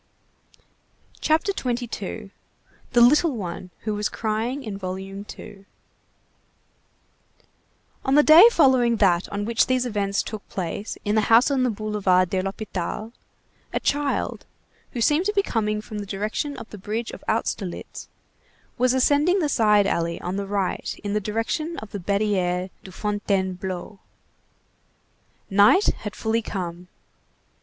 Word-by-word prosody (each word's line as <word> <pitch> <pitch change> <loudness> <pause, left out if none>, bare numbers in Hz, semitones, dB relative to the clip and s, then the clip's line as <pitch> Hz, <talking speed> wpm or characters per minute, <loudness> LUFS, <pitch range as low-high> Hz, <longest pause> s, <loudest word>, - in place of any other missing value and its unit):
CHAPTER 320 +6 +2
XXII—THE 235 - -4
LITTLE 285 +3 +5
ONE 180 -2 -6
WHO 215 - -2
WAS 210 0 -1
CRYING 230 +5 -2
IN 215 -4 -5
VOLUME 195 +1 -6
TWO 205 -2 -11 2.4
On 265 0 +2
the 295 - +7
day 325 +9 +9
following 260 - +4
that 185 -5 +2
on 205 0 -3
which 230 0 +2
these 255 -1 +1
events 200 -4 -1
took 215 -2 -8
place 195 +3 -4
in 205 - +1
the 215 -1 +1
house 235 +5 +6
on 270 -2 +1
the 255 - +2
Boulevard 200 -4 +1
de 190 - +1
l'Hôpital, 195 +2 -4 0.6
a - - -1
child, 290 0 -1 0.5
who 240 - -3
seemed 300 - +3
to 420 - 0
be 400 -1 +2
coming 215 - -1
from 215 0 -7
the 205 - -6
direction 210 +9 -3
of - - -8
the 210 - -9
bridge 220 +4 -3
of - - -11
Austerlitz, 205 -4 -3 0.7
was 255 +1 +3
ascending 290 +7 +3
the 330 -6 +1
side 210 -5 +4
alley 170 -3 -1
on 180 +2 -4
the 200 0 -3
right 195 -2 -2
in 205 -1 -2
the 210 - 0
direction 230 - -2
of 215 - -8
the 205 - -5
Barrière 190 -2 0
de 190 - -11
Fontainebleau. 190 -1 -2 1.5
Night 210 - +6
had 210 -1 -6
fully 225 +1 0
come. 180 -4 -5
210 Hz, 140 wpm, -24 LUFS, 195-245 Hz, 2.4 s, day